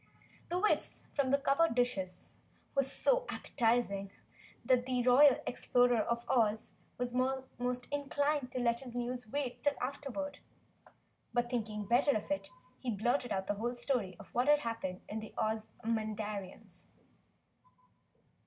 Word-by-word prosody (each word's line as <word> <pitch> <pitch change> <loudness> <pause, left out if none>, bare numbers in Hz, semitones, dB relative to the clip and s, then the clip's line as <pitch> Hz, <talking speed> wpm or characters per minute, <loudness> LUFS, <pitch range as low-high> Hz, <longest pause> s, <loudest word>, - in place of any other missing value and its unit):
The 350 - 0
whiffs 425 +4 +1
from 280 -2 +1
the 280 - +4
covered 280 +1 +2
dishes 195 -8 -1 0.4
were 275 - +4
so - - +2
appetizing 225 -4 0 0.6
the 250 0 +2
Royal 265 +2 +7
Explorer 245 -1 +3
of 235 +2 -1
Oz 220 -3 +2 0.3
was 245 0 -2
almost 250 -1 -1
inclined 285 -1 0
to 255 - -3
let 235 -1 +2
his 245 -3 -9
news 245 -1 -3
wait 265 +1 -3
till 290 -1 +2
afterward. 280 +2 -4 1.0
But 240 0 +1
thinking 215 -3 -2
better 250 +4 +4
of 215 - -7
it, 295 - -1 0.3
he 255 - -4
blurted 240 +4 0
out 190 -1 -1
the 205 - 0
whole 235 +4 -2
story 240 -7 -1
of - - -14
what 245 +3 +1
had 295 0 +6
happened 190 -7 -4
to 215 - -4
the 220 - -9
Ozamandarins. 215 -3 -3
245 Hz, 135 wpm, -33 LUFS, 220-270 Hz, 1.0 s, Royal